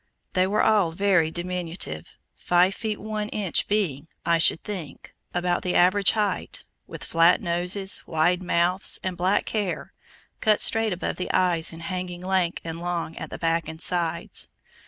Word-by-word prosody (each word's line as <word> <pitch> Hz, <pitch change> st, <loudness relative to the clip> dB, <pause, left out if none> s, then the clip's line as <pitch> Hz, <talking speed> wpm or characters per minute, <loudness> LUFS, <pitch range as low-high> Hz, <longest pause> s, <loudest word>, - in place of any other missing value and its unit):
They 185 Hz, 0 st, +3 dB
were 210 Hz, +2 st, +2 dB
all 205 Hz, -6 st, +3 dB
very 180 Hz, -2 st, +2 dB
diminutive, 175 Hz, -, -4 dB, 0.2 s
five 180 Hz, +2 st, +2 dB
feet 215 Hz, 0 st, -3 dB
one 215 Hz, 0 st, -4 dB
inch 200 Hz, -6 st, -1 dB
being, 165 Hz, -9 st, 0 dB, 0.2 s
I 170 Hz, -1 st, +3 dB
should 165 Hz, -, +2 dB
think, 185 Hz, -8 st, -7 dB, 0.2 s
about 175 Hz, 0 st, 0 dB
the 180 Hz, -, -2 dB
average 185 Hz, +2 st, +4 dB
height, 210 Hz, -2 st, -2 dB, 0.2 s
with -, -, -8 dB
flat 165 Hz, +1 st, +4 dB
noses, 185 Hz, +4 st, 0 dB
wide 170 Hz, +3 st, +2 dB
mouths, 180 Hz, +1 st, +1 dB
and 185 Hz, -1 st, -2 dB
black 185 Hz, +3 st, +1 dB
hair, 205 Hz, -4 st, -3 dB, 0.5 s
cut 215 Hz, -1 st, +3 dB
straight 225 Hz, -1 st, +3 dB
above 180 Hz, -, -3 dB
the 180 Hz, -, -3 dB
eyes 170 Hz, -3 st, +2 dB
and 165 Hz, 0 st, -10 dB
hanging 180 Hz, 0 st, -4 dB
lank 185 Hz, -2 st, 0 dB
and 165 Hz, 0 st, -6 dB
long 175 Hz, -2 st, -3 dB
at -, -, -6 dB
the -, -, -6 dB
back 165 Hz, -1 st, 0 dB
and 160 Hz, 0 st, -7 dB
sides. 170 Hz, -2 st, -1 dB
180 Hz, 160 wpm, -25 LUFS, 170-195 Hz, 0.5 s, average